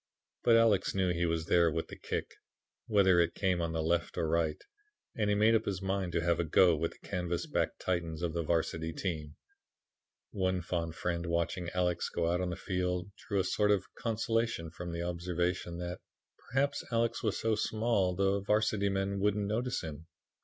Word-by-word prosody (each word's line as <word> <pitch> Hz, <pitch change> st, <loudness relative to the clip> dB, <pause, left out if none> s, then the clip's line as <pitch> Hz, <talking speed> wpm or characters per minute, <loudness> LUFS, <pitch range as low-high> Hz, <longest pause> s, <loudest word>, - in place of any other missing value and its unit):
But 115 Hz, -, +6 dB
Alex 115 Hz, -5 st, +3 dB
knew 95 Hz, -2 st, +2 dB
he 85 Hz, 0 st, 0 dB
was 80 Hz, -1 st, -1 dB
there 85 Hz, 0 st, +4 dB
with 80 Hz, +1 st, -3 dB
the -, -, -7 dB
kick, -, -, -4 dB, 0.6 s
whether 95 Hz, -4 st, +5 dB
it 85 Hz, 0 st, +2 dB
came 95 Hz, -3 st, +1 dB
on 85 Hz, -1 st, -1 dB
the 80 Hz, -1 st, -1 dB
left 85 Hz, +1 st, 0 dB
or 80 Hz, -, 0 dB
right, 80 Hz, -1 st, +1 dB, 0.6 s
and 105 Hz, -2 st, 0 dB
he 105 Hz, -, +3 dB
made 110 Hz, +2 st, +5 dB
up 115 Hz, -, +2 dB
his 95 Hz, -3 st, -2 dB
mind 95 Hz, -2 st, -1 dB
to 85 Hz, -, +1 dB
have 85 Hz, -1 st, +2 dB
a -, -, +2 dB
go 85 Hz, +2 st, +5 dB
with 80 Hz, +2 st, -2 dB
the -, -, -17 dB
canvas 90 Hz, -3 st, -2 dB
backed -, -, -1 dB
Titans 85 Hz, -2 st, -2 dB
of 85 Hz, -2 st, -1 dB
the 85 Hz, -, -1 dB
Varsity 80 Hz, 0 st, -1 dB
team. 80 Hz, -6 st, -4 dB, 1.0 s
One 95 Hz, -4 st, 0 dB
fond 85 Hz, -2 st, -2 dB
friend 85 Hz, 0 st, -2 dB
watching 85 Hz, +1 st, -1 dB
Alex 90 Hz, -1 st, 0 dB
go 85 Hz, 0 st, 0 dB
out 90 Hz, +1 st, +1 dB
on 90 Hz, -, -1 dB
the 90 Hz, -, -3 dB
field 90 Hz, 0 st, -2 dB, 0.2 s
drew 100 Hz, -2 st, +1 dB
a -, -, +3 dB
sort 105 Hz, +2 st, +1 dB
of 100 Hz, -2 st, +3 dB
consolation 115 Hz, -6 st, -1 dB
from 85 Hz, +1 st, -6 dB
the 85 Hz, 0 st, -3 dB
observation 85 Hz, 0 st, -2 dB
that 90 Hz, 0 st, -5 dB, 0.5 s
"perhaps 140 Hz, +3 st, +1 dB
Alex 115 Hz, 0 st, +1 dB
was 105 Hz, -3 st, -1 dB
so 110 Hz, 0 st, +1 dB
small 110 Hz, -4 st, +1 dB
the 100 Hz, +1 st, +2 dB
Varsity 105 Hz, 0 st, +2 dB
men 100 Hz, 0 st, -1 dB
wouldn't 105 Hz, +1 st, +1 dB
notice 120 Hz, +4 st, -1 dB
him." 80 Hz, 0 st, -7 dB
90 Hz, 195 wpm, -32 LUFS, 85-100 Hz, 1.0 s, But